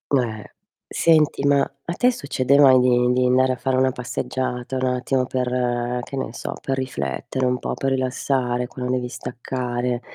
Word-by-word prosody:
Eh. 110 -5 -1 0.5
Senti, 155 -4 +3
ma 140 -1 +4
a 170 - -5
te 250 +7 +3
succede 140 - +1
mai 130 -3 +7
di 125 0 +3
di 125 0 +2
andare 130 +1 +3
a - - -3
fare 130 0 0
una 130 0 +3
passeggiata, 125 +1 -3
un 130 - 0
attimo 130 +1 0
per 125 -1 -1
che 135 - -8
ne 115 -3 -3
so, - - -5
per 135 0 -2
riflettere, 125 - -3
un 125 0 +1
po' - - -3
per 135 0 -1
rilassare, 130 -1 0
quando 125 0 -4
devi 125 -1 -1
staccare 125 0 -3
125 Hz, 170 wpm, -22 LUFS, 125-130 Hz, 0.5 s, mai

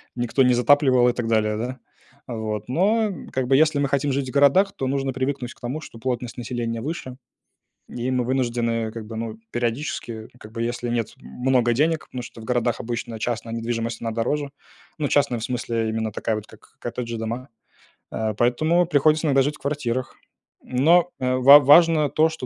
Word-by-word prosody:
никто 120 +2 +1
не 125 0 +4
затапливал 130 0 +4
и - - 0
так 120 -2 -3
далее, 110 -1 +1
да. 125 +3 -4 0.5
Вот, 110 -3 -4
но 210 - +2 0.2
как 130 -1 -1
бы, 135 +1 +4
если 155 -1 +3
мы 140 -1 0
хотим 140 0 0
жить 135 -1 -2
в - - -6
городах, 145 +8 +4
то 135 - -3
нужно 135 0 -1
привыкнуть 130 -1 -3
к - - -27
тому, 130 +6 -4
что 115 - -11
плотность 125 0 -3
населения 120 -1 -3
выше. 135 -3 -5 0.7
И 125 +2 -3
мы 125 -1 +1
вынуждены, 120 -3 -1
как 110 -1 -7
бы, 110 - -8
ну, 110 -1 -5
периодически, 120 -2 -3
как 110 - -12
бы, 115 - -5
если 120 +1 -2
нет 115 -2 -2
много 125 -2 0
денег, 155 +5 +1
потому 125 - -7
что 120 -1 -11
в - - -10
городах 120 -1 0
обычно 120 -1 -4
частная 115 0 -3
недвижимость, 115 0 -3
она 115 - -2
дороже. 140 +6 -2 0.5
Ну, 150 - 0
частная 135 -4 +1
в 110 - -6
смысле, 115 -2 -2
именно 110 0 -2
такая 110 +2 -2
вот 105 -1 -6
как 110 - -19
коттеджи 120 -1 -4
дома. 115 +4 -5 0.6
А, 110 -1 -2
поэтому 155 - +2
приходится 155 +1 +3
иногда 135 -2 +4
жить 145 +2 -2
в - - -36
квартирах, 130 -3 -3 0.5
но, 165 +7 +3
э, 130 0 0
ва 140 +3 +9
важно 155 +1 +5
то, 155 +1 +3
что 160 -5 -7
125 Hz, 190 wpm, -23 LUFS, 115-140 Hz, 0.7 s, ва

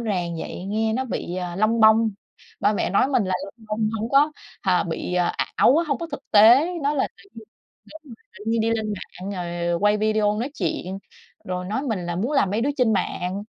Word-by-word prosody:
ràng 180 -7 -2
vậy, 180 - -6
nghe 220 +2 0
nó 260 +3 -1
bị, 180 -7 -4
à, 180 -1 -4
lông 215 +3 +2
bông. 220 0 +6 0.5
Ba - - +3
mẹ 205 - -1
nói 200 +7 +3
mình 255 -7 +2
là 185 0 -1
lông 220 +3 -13
bông 215 0 0
hổng 225 +2 -3
có, 290 +2 +4 0.3
à, 185 -2 +2
bị 170 +1 -4 0.4
ảo 270 - +5
á, 335 - +2
hông 285 - 0
có 335 - -4
thực 275 - -4
tế, 235 +10 +7
nói 290 +1 0
là 265 - +1
tự 200 0 -22
nhiên 225 - -11 0.5
cái 315 - -10
mình 255 - -11 0.2
tự 210 - -11
nhiên 230 0 +1
đi 225 +1 +1
lên 220 -1 -1
mạng 190 0 -7
rồi 175 -1 -2
quay 205 +1 +3
video 210 -1 +1
nói 245 +5 -2
chuyện, 185 +1 -3 0.5
rồi 180 0 -4
nói 215 +8 -2
mình 210 -10 -3
là 175 - -3
muốn 235 +11 -1
làm 240 -10 +2
mấy 210 +3 0
đứa 275 +5 +1
trên 245 -4 +3
mạng, 190 0 -2
215 Hz, 225 wpm, -23 LUFS, 185-230 Hz, 0.5 s, tế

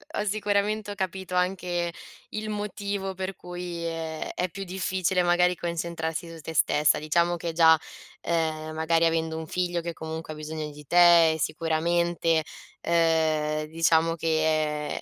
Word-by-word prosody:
ho 210 - -1
sicuramente 205 0 0
ho - - -6
capito 190 -1 -4
anche 180 -1 0 0.4
il 215 0 -4
motivo 200 -2 -3
per 190 0 -4
cui 175 -1 -6
è 165 -1 -4
è 180 0 -1
più 195 +3 -6
difficile, 185 -1 0
magari, 180 +1 +3
concentrarsi 170 -1 -3
su 165 -1 -10
te 160 - -7
stessa. 150 -1 +3
Diciamo 170 +3 +1
che 170 0 -4
già, 160 -1 +6 0.4
ehm, 155 -1 -1
magari, 165 +1 +2
avendo 160 -1 0
un 160 - -6
figlio 175 -1 -1
che 170 0 -4
comunque 160 0 -6
ha - - -10
bisogno 155 0 -5
di 150 0 -13
te, 170 -2 +6
sicuramente, 165 +1 +1 0.4
ehm 165 -2 +2 0.3
diciamo 165 0 +2
che 155 -2 0
170 Hz, 145 wpm, -26 LUFS, 160-180 Hz, 0.4 s, già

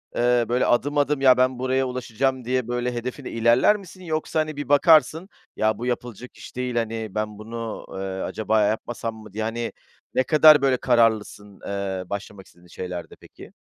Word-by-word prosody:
eee, 120 0 +2
böyle, 125 +1 +2
adım, 145 +4 +1
adım, 145 -1 +1
"Ya, 130 -2 +6
ben 130 0 +2
buraya 130 +1 0
ulaşacağım." 125 0 -2
diye, 125 -1 -1
böyle, 120 0 -2
hedefine 125 +3 -5
ilerler 115 - +4
misin, 185 -1 -13
yoksa, 160 -1 -2
hani, 155 -1 -2
bir 145 -2 -5
bakarsın, 160 +3 +4 0.3
"Ya, 110 -1 +1
bu 120 - -5
yapılacak 120 0 -5
iş - - -12
değil, 125 -1 -3
hani, 115 -1 -2
ben 105 -1 -3
bunu, 115 +1 -6
eee, - - -7 0.3
acaba 110 0 0
yapmasam 110 +2 -2
mı?" 110 -2 -13
diye, 110 +1 -3
hani, 115 +1 -3 0.4
ne 130 - +2
kadar 155 0 +6
böyle 135 -2 +2
kararlısın, 110 -5 0
eee, 100 -2 -3
başlamak 100 -1 -7
istediğin 90 0 -21
şeylerde, 90 0 -7
peki? - - -15
120 Hz, 175 wpm, -23 LUFS, 110-130 Hz, 0.4 s, Ya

